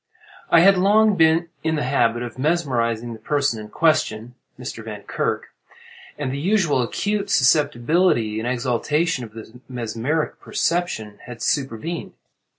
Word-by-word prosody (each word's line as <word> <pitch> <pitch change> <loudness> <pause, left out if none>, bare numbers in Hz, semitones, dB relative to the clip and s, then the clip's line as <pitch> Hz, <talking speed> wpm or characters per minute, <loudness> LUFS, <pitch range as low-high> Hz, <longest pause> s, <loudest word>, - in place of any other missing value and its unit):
I 165 - +6
had 195 +3 +7
been 185 -1 0
long 210 -2 +4 0.4
in 160 0 +1
the 150 - -1
habit 120 -2 +1
of 120 +1 -8
mesmerizing 120 -7 0
the 110 - -10
person 140 -1 0
in 105 0 -9
question 125 -6 +1 0.3
(Mr. 120 -2 -7
Vankirk), 105 -2 -3 0.7
and 140 -3 -3
the 140 - -3
usual 175 -5 +2
acute 205 - -2
susceptibility 140 - +2
and 115 - -3
exaltation 130 +4 0
of 110 -2 -10
the 115 +2 -11
mesmeric 125 +5 -2
perception 115 -12 -2
had 120 -2 -8
supervened. 140 +5 -2
130 Hz, 135 wpm, -22 LUFS, 115-165 Hz, 0.7 s, had